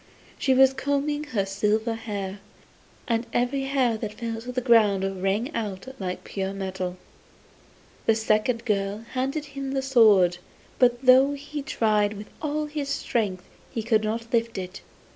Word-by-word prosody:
She 265 -2 +3
was 265 0 +6
combing 285 +2 -1
her 220 -9 -1
silver 210 +3 0
hair, 205 -3 -5 0.7
and 235 0 0
every 265 +3 0
hair 260 -4 +1
that 215 -1 -5
fell 225 0 -4
on 250 +2 -6
the 255 - 0
ground 200 -6 +3
rang 210 +10 0
out 205 +1 -4
like 185 -2 -4
pure 195 0 -3
metal. 190 -2 -4 1.1
The 225 - +5
second 220 +2 +1
girl 205 0 -1
handed 270 +4 -1
him 275 -1 -4
the 270 -1 0
sword, 210 -9 +5 0.4
but 245 0 +3
though 260 +2 +7
he 290 +1 -6
tried 215 -7 +1
with 210 0 -9
all 305 0 -1
his 295 -2 -4
strength 210 -9 -1 0.3
he 225 - -4
could 220 -1 +2
not 230 +2 -3
lift 230 -2 +1
it. 185 0 -6
230 Hz, 155 wpm, -25 LUFS, 205-265 Hz, 1.1 s, though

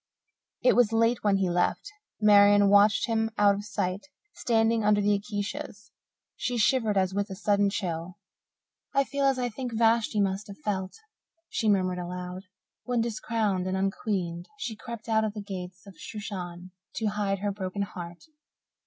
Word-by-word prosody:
It - - +5
was 240 -3 +4
late 230 +1 +2
when 205 -2 +3
he 195 -1 +1
left. 175 - 0 0.3
Marian 205 -1 +6
watched 205 0 +5
him 225 -1 0
out 205 -1 +5
of 200 +1 -4
sight, 200 +2 -3 0.3
standing 225 - +1
under 210 0 +4
the 205 0 +3
acacias. 205 +1 -5 0.4
She 245 -1 -2
shivered 225 -2 +2
as 190 -1 +1
with 200 +1 -1
a 190 - -6
sudden 205 0 +2
chill. 180 -3 -4 0.8
"I 275 - +5
feel 280 +1 -1
as 270 -1 +3
I 245 -1 -1
think 240 +1 -5
Vashti 225 -1 +2
must 195 +1 0
have 200 - -10
felt," 190 -8 -3 0.6
she 220 - 0
murmured 185 -3 +1
aloud, 180 +1 -6 0.4
"when, 245 -1 -1
discrowned 220 -4 -1
and 185 0 -1
unqueened, 190 -3 -2
she 245 -5 -4
crept 235 +1 -9
out 220 -1 +2
of 215 -1 -2
the 210 - -5
gates 185 -2 -7
of 195 -3 -14
Shushan 185 -4 -7 0.2
to 225 - -2
hide 205 -2 0
her 205 - +1
broken 195 0 -3
heart. 175 -2 -8
205 Hz, 165 wpm, -27 LUFS, 190-225 Hz, 0.8 s, Marian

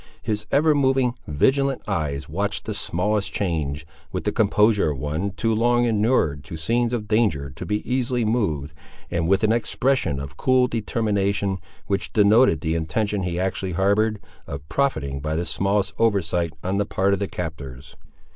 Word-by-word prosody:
His 105 -1 -2
ever 150 +2 +4
moving, 135 -3 +2
vigilant 135 - +1
eyes, 75 -8 -2
watched 100 +6 -2
the 110 - -3
smallest 100 +1 -1
change, 80 -6 -2 0.3
with - - -3
the - - 0
composure 105 -4 +3
of 75 - -3
one 75 +8 -2
too 110 +3 -1
long 120 +2 +3
inured 105 - +1
to 80 - -7
scenes 115 +8 +1
of 115 -4 -3
danger 100 - +1
to 75 - -8
be 105 0 -2
easily 125 -2 0
moved, 80 - -1 0.4
and 85 -1 0
with 95 +3 +2
an 110 - +4
expression 120 - +1
of 70 -1 -8
cool 130 -1 +3
determination 100 -4 -1 0.3
which 100 -1 -2
denoted 105 - +5
the 80 - -1
intention 100 +6 -1
he 90 -1 -2
actually 95 0 -2
harboured, 100 +4 +2 0.3
of 70 +2 -7
profiting 75 - 0
by 75 +2 -2
the 85 +2 -1
smallest 100 +2 0
oversight 90 -7 +1
on 95 +2 -1
the 105 - +1
part 100 +1 +1
of 100 - 0
the 100 - -1
captors. 75 -7 -7
100 Hz, 165 wpm, -23 LUFS, 80-115 Hz, 0.4 s, denoted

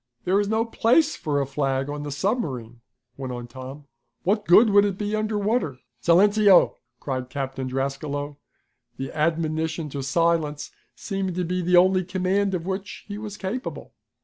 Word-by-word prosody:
"There's 200 +3 +2
no 220 +2 +1
place 250 +7 +3
for 145 -3 -1
a 140 - 0
flag 135 -1 -1
on 145 0 -4
the 145 0 -5
submarine," 135 - -2 0.4
went 130 -2 -5
on 120 -1 -5
Tom. 130 +4 -10 0.4
"What 210 +3 0
good 210 +5 +7
would 200 0 +6
it 200 -2 -1
be 210 +1 -2
under 215 0 -1
water?" 200 - 0 0.2
"Silenceo!" 200 - +5 0.3
cried 130 -2 -3
Lieutenant 135 0 -4
Drascalo, 140 +2 -3 0.6
the 135 0 -5
admonition 160 0 -1
to 140 0 -5
silence 155 +1 0 0.2
seeming 195 -3 -3
to 180 - -1
be 180 +2 -1
the 180 +1 +3
only 185 +1 +5
command 190 +2 0
of 170 -2 -4
which 195 +2 -5
he 205 0 -6
was 210 -1 -7
capable. 220 +7 -5
170 Hz, 160 wpm, -24 LUFS, 140-200 Hz, 0.6 s, good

